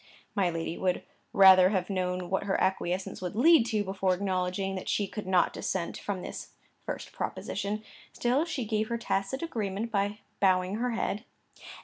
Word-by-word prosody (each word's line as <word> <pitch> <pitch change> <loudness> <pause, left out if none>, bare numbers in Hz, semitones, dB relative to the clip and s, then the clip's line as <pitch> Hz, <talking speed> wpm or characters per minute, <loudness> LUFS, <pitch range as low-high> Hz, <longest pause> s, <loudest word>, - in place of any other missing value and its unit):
My 195 -4 +2
lady 165 0 -3
would 185 -1 0 0.3
rather 190 -1 +8
have 190 -3 0
known 180 -2 -2
what 190 +1 0
her 195 - +1
acquiescence 185 0 -1
would 180 +1 -4
lead 265 0 +6
to, 215 -3 0
before 190 -1 0
acknowledging 185 0 -1
that 185 - -5
she 205 - +1
could 205 0 -7
not 185 -2 +3
dissent 180 -3 -2
from 195 -3 -4
this - - -7 0.3
first - - -5
proposition; 210 +2 -3 0.3
still 250 +5 +1
she 315 -8 -3
gave 215 0 0
her 235 - -1
tacit 230 +4 -2
agreement 220 -6 -3
by 205 0 0 0.2
bowing 185 0 +2
her 245 +1 -1
head. 215 -1 -2
195 Hz, 165 wpm, -29 LUFS, 185-215 Hz, 0.3 s, rather